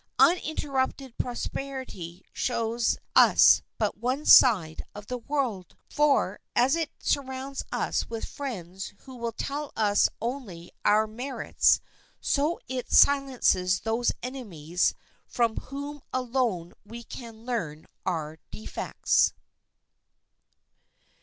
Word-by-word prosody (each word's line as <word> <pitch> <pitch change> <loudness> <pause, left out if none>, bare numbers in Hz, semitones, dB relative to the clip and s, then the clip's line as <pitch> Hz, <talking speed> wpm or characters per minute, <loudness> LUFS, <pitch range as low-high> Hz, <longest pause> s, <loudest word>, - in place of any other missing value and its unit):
Uninterrupted 275 -6 +1
prosperity 245 -8 -5
shows 230 -1 0 0.2
us - - +7 0.2
but 210 -2 -1
one 255 +6 -1
side 185 -11 +6
of 205 0 -8
the 250 +3 -4
world. 240 - -3 0.2
For, 285 -9 +2 0.2
as 255 +5 +4
it 325 -3 -1
surrounds 270 0 -2
us - - -1
with 225 -1 -4
friends 195 -8 -6
who 260 -1 -12
will 235 -1 -3
tell 285 +5 -4
us 205 -2 +3
only 230 -9 -5
our 215 +1 +4
merits, 245 +5 +1 0.4
so 295 +4 0
it 255 -1 -4
silences 255 -10 +4
those 225 +2 +1
enemies 180 - -1 0.3
from 230 -2 +1
whom 285 +1 -6
alone 240 -9 -1
we 230 +3 -9
can 230 -2 -10
learn 160 -11 -3 0.2
our 160 -3 -3
defects. 215 - 0
240 Hz, 105 wpm, -27 LUFS, 205-270 Hz, 0.4 s, us